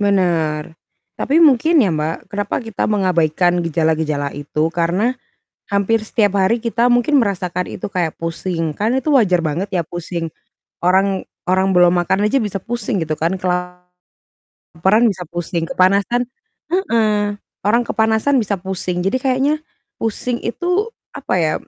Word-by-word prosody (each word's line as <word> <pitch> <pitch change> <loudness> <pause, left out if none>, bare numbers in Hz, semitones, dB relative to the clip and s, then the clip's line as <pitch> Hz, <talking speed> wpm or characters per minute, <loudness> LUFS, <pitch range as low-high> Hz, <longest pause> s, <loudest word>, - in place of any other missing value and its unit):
Benar, 170 -6 +1 0.5
tapi 285 - +1
mungkin 300 0 +5
ya 190 - +1
Mbak, 155 +4 -3
kenapa 205 0 -2
kita 225 -2 -2
mengabaikan 175 -3 +2
gejala-gejala 155 -3 0
itu? 150 +3 -2
Karena 175 +8 +1 0.6
hampir 200 +3 +1
setiap 210 -2 +1
hari 220 +5 +2
kita 235 +1 +1
mungkin 245 +4 +3
merasakan 180 -5 -1
itu 195 - -6
kayak 175 -4 -1
pusing, 165 0 -3
kan 215 - -1
itu 265 +4 0
wajar 190 - +3
banget 165 +5 -1
ya 175 - +1
pusing. 170 0 -5 0.5
Orang 190 +1 +2 0.2
orang 190 +1 +2
belum 180 -1 +5
makan 190 +4 +1
aja 255 +4 +2
bisa 205 -2 -3
pusing 230 0 -3
gitu 155 - -1
kan, 165 +5 -1
kelaparan 180 0 -4 1.1
bisa 185 -3 -5
pusing, 170 0 -3
kepanasan 200 +8 +2 0.4
heeh, 220 - +1 0.3
orang 230 +4 +4
kepanasan 220 +4 +1
bisa 215 -4 0
pusing. 185 -1 -3
Jadi 195 +8 +1
kayaknya 265 +3 +1 0.4
pusing 235 +2 -2
itu, 360 - -1 0.2
apa - - -4
ya, 155 -1 +1
190 Hz, 140 wpm, -18 LUFS, 175-225 Hz, 1.1 s, mungkin